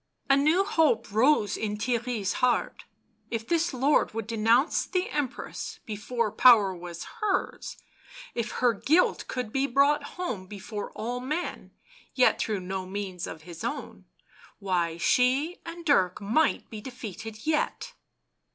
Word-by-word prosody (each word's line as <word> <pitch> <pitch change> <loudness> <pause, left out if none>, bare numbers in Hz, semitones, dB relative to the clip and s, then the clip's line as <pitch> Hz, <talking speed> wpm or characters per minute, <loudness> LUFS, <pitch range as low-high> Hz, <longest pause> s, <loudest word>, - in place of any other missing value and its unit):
A - - +7
new 310 +7 +3
hope 290 - +2
rose 220 -2 +3
in 210 -1 -3
Theirry's 235 -2 -1
heart; 250 -1 +1 0.4
if 230 -1 -4
this 340 +1 +1
lord 265 -2 +2
would 225 -2 -3
denounce 230 +6 +2
the 370 0 -1
Empress 290 -4 -4
before 215 +1 -2
power 215 -4 +6
was 175 -1 -7 0.2
hers, 405 -3 -1 0.6
if 235 -1 -3
her 245 -2 +2
guilt 315 - +2
could 250 -4 -4
be 270 +1 +1
brought 285 +3 +2
home 245 - -4
before 205 +1 -6
all 245 +3 -3
men 300 +8 -4 0.2
— - - -27
yet 255 - +4
through 210 -4 -1
no 185 0 -4
means 190 -2 -4
of 160 - -8
his 170 -1 -9
own - - -5 0.3
— - - -24
why, 175 -4 -1
she 260 - +2
and 335 0 -8
Dirk 185 - +3
might 230 +10 +1
be 215 -2 -7
defeated 225 -3 -8
yet 315 +10 -1
235 Hz, 145 wpm, -27 LUFS, 205-285 Hz, 0.6 s, A